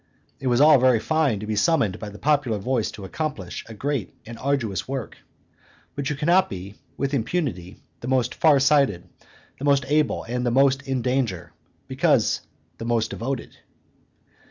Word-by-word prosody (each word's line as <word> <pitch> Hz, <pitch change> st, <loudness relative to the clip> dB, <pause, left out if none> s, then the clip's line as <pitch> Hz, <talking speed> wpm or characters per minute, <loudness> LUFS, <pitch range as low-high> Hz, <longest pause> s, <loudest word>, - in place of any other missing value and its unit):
It 135 Hz, -, -4 dB
is 120 Hz, 0 st, +3 dB
all 150 Hz, -1 st, +7 dB
very 125 Hz, -2 st, +4 dB
fine 150 Hz, -5 st, +1 dB
to -, -, -5 dB
be 110 Hz, 0 st, -2 dB
summoned 105 Hz, -, +2 dB
by 105 Hz, -, -6 dB
the 105 Hz, -, -11 dB
popular 145 Hz, -6 st, +1 dB
voice 115 Hz, +2 st, -1 dB
to 100 Hz, -, -9 dB
accomplish 105 Hz, -, -4 dB
a 110 Hz, -, -9 dB
great 135 Hz, -2 st, -3 dB
and 115 Hz, -, -8 dB
arduous 130 Hz, -8 st, -1 dB
work; 135 Hz, -4 st, -5 dB, 0.8 s
but 140 Hz, -1 st, -2 dB
you 150 Hz, -, -1 dB
cannot 175 Hz, +6 st, +3 dB
be, 95 Hz, +1 st, -7 dB, 0.2 s
with 140 Hz, +1 st, -2 dB
impunity, 110 Hz, -, -2 dB, 0.2 s
the 120 Hz, -, -7 dB
most 130 Hz, -2 st, +1 dB
far 150 Hz, -4 st, +4 dB
sighted, 135 Hz, -10 st, +2 dB, 0.5 s
the 140 Hz, -, -4 dB
most 140 Hz, -2 st, +3 dB
able, 150 Hz, +1 st, +1 dB
and 125 Hz, +2 st, -3 dB
the 125 Hz, -, +1 dB
most 135 Hz, +2 st, +3 dB
in 130 Hz, -3 st, -1 dB
danger, 115 Hz, -, -1 dB, 0.3 s
because -, -, +2 dB, 0.4 s
the 115 Hz, -, -5 dB
most 115 Hz, -2 st, 0 dB
devoted. 130 Hz, +1 st, -5 dB
130 Hz, 170 wpm, -24 LUFS, 110-140 Hz, 0.8 s, all